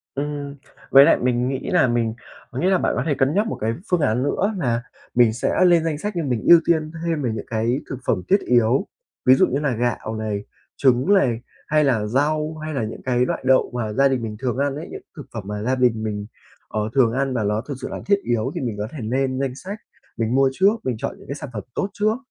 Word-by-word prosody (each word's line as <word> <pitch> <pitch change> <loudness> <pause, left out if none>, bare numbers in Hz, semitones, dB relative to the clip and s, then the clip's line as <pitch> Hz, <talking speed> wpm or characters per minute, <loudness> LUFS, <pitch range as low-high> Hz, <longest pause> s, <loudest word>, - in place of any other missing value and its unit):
Ừm. 145 0 -4 0.4
Với 135 +1 +9
lại - - +5
mình 125 0 0
nghĩ 135 0 -3
là - - +4
mình 115 -2 0 0.4
có 125 - -6
nghĩa 180 +6 +2
là 190 - +4
bạn - - 0
có 125 - 0
thể 150 - +2
cân 135 +2 +1
nhắc 205 +3 +2
một - - -4
cái 110 +1 0 0.2
phương 180 -2 +2
án 120 -2 +1
nữa 200 +9 0
nà 120 -7 0 0.3
mình 120 -2 +5
sẽ 120 +9 +1
lên 170 -2 +5
danh 160 -3 -1
sách 210 +6 -3
nhưng 165 -5 -1
mình 120 -4 -1
ưu 170 -1 +9
tiên 155 -2 +1
thêm 165 -3 -1
về 125 - 0
những 110 -2 -5
cái 115 +4 0
thực 130 - -4
phẩm 95 -6 +1
thiết 195 +1 +4
yếu. 125 - +2 0.4
Ví 130 - +8
dụ - - +4
như 135 - -1
là 140 -5 0
gạo 115 -1 -2
này, 105 -2 -3 0.3
trứng 130 +4 +3
này, 130 - +3 0.3
hay 155 0 +3
là 115 -6 +1
rau 150 +6 0
hay 155 0 -4
là 135 - -1
những 110 - -7
cái 125 -1 +1
loại - - -3
đậu 130 0 +4
mà 110 -3 -2
gia 135 +5 +4
đình 130 -3 -1
mình 110 -2 -5
thường 125 0 -2
ăn 140 0 0
ấy, 155 - -6
những - - -8
thực 145 - -9
phẩm 110 - -4
mà 105 0 -4
gia 125 +4 +1
đình 125 -4 +2
mình, 105 -2 -3 0.4
ờ, 110 - -2
thường 125 -4 +4
ăn 135 +1 -1
và 115 -4 0
ló 105 +1 0
thực 140 - -3
sự - - -3
là - - -6
thiết 200 0 +4
yếu 120 -2 0
thì - - -3
mình 120 -5 -3
có 105 - -3
thể 155 - -9
nên 130 +3 -1
danh 135 -2 -1
sách 195 +9 -7 0.4
mình 115 +1 -1
mua 135 0 +4
trước, 195 +9 +3
mình 125 -3 -1
chọn - - -4
những - - -16
cái 140 - -3
sản 145 -2 -8
phẩm 105 -3 -5
tốt 195 - -1
trước. 215 +2 +1
130 Hz, 260 wpm, -22 LUFS, 115-150 Hz, 0.4 s, Với